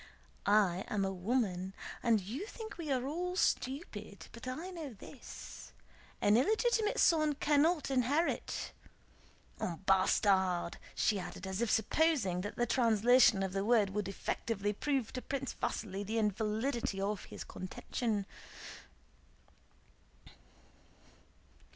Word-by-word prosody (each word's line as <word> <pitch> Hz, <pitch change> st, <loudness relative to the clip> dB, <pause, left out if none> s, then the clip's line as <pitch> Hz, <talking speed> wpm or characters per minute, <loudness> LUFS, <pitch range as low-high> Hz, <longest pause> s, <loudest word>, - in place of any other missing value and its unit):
"I 200 Hz, -3 st, +4 dB
am 200 Hz, -2 st, 0 dB
a 195 Hz, -, -2 dB
woman, 190 Hz, -2 st, -1 dB, 0.3 s
and 230 Hz, -3 st, +3 dB
you 240 Hz, -, -5 dB
think 445 Hz, -2 st, -8 dB
we 310 Hz, -4 st, -3 dB
are 255 Hz, -1 st, +1 dB
all 355 Hz, +5 st, -2 dB
stupid; 215 Hz, -, -2 dB
but 235 Hz, +2 st, -10 dB
I 320 Hz, +9 st, -4 dB
know 320 Hz, -8 st, -6 dB
this: 235 Hz, +5 st, -11 dB, 0.5 s
an 205 Hz, +2 st, +5 dB
illegitimate 435 Hz, -, +2 dB
son 310 Hz, -3 st, +4 dB
cannot 295 Hz, +1 st, +2 dB
inherit... 270 Hz, +6 st, 0 dB, 0.9 s
un 170 Hz, 0 st, -4 dB
bâtard!"* 190 Hz, -2 st, +3 dB, 0.2 s
she 210 Hz, -2 st, +2 dB
added, 185 Hz, +1 st, -7 dB
as 190 Hz, +3 st, -3 dB
if 235 Hz, -, +1 dB
supposing 220 Hz, -, +2 dB
that 205 Hz, -, -5 dB
this 240 Hz, -, +1 dB
translation 230 Hz, -3 st, +5 dB
of 190 Hz, -1 st, -3 dB
the 195 Hz, 0 st, 0 dB
word 215 Hz, -3 st, +3 dB
would 205 Hz, -1 st, -2 dB
effectively 205 Hz, +1 st, -2 dB
prove 270 Hz, +1 st, -1 dB
to 255 Hz, -, -3 dB
Prince 270 Hz, -1 st, -3 dB
Vasíli 200 Hz, -2 st, -2 dB
the 220 Hz, +3 st, -2 dB
invalidity 215 Hz, +1 st, 0 dB
of 200 Hz, +1 st, -2 dB
his -, -, -8 dB
contention. 205 Hz, +3 st, -3 dB
225 Hz, 120 wpm, -33 LUFS, 195-275 Hz, 0.9 s, an